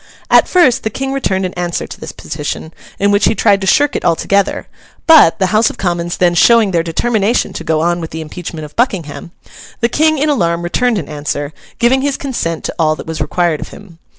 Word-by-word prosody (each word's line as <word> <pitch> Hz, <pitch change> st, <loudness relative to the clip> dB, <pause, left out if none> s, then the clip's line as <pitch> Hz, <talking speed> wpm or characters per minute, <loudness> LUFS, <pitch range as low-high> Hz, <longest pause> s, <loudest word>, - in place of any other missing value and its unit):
At -, -, +5 dB
first 295 Hz, -10 st, +3 dB
the 220 Hz, -, -2 dB
King 270 Hz, +5 st, -4 dB
returned 190 Hz, -8 st, -1 dB
an 185 Hz, -, -4 dB
answer 175 Hz, -1 st, -3 dB
to -, -, -11 dB
this -, -, -7 dB
petition, 155 Hz, +1 st, -6 dB, 0.2 s
in 200 Hz, +1 st, +1 dB
which 205 Hz, 0 st, +3 dB
he -, -, +2 dB
tried 205 Hz, -3 st, +2 dB
to 190 Hz, -, -2 dB
shirk 290 Hz, +4 st, +3 dB
it -, -, -2 dB
altogether; 195 Hz, +4 st, 0 dB, 0.4 s
but, 315 Hz, -, +6 dB
the 190 Hz, -, +1 dB
House 215 Hz, +1 st, +4 dB
of -, -, -10 dB
Commons 175 Hz, -2 st, -2 dB
then 175 Hz, -1 st, +2 dB
showing 220 Hz, +4 st, +4 dB
their 170 Hz, -2 st, +1 dB
determination 215 Hz, +7 st, 0 dB
to -, -, -6 dB
go 155 Hz, -1 st, 0 dB
on 175 Hz, +1 st, 0 dB
with 160 Hz, -, -6 dB
the 160 Hz, -, -6 dB
impeachment 160 Hz, 0 st, -7 dB
of 150 Hz, -, -14 dB
Buckingham, 180 Hz, -, -2 dB, 0.5 s
the 235 Hz, -, +1 dB
King 315 Hz, +4 st, +2 dB
in 295 Hz, +2 st, 0 dB
alarm 170 Hz, -, 0 dB
returned 235 Hz, +7 st, 0 dB
an 165 Hz, -, -4 dB
answer, 145 Hz, 0 st, -4 dB, 0.2 s
giving 245 Hz, +3 st, +2 dB
his 280 Hz, 0 st, -1 dB
consent 200 Hz, -, -3 dB
to -, -, -4 dB
all 155 Hz, -1 st, +2 dB
that -, -, -9 dB
was 160 Hz, 0 st, -5 dB
required 175 Hz, -4 st, 0 dB
of -, -, -6 dB
him. 175 Hz, -5 st, -14 dB
185 Hz, 220 wpm, -15 LUFS, 165-235 Hz, 0.5 s, but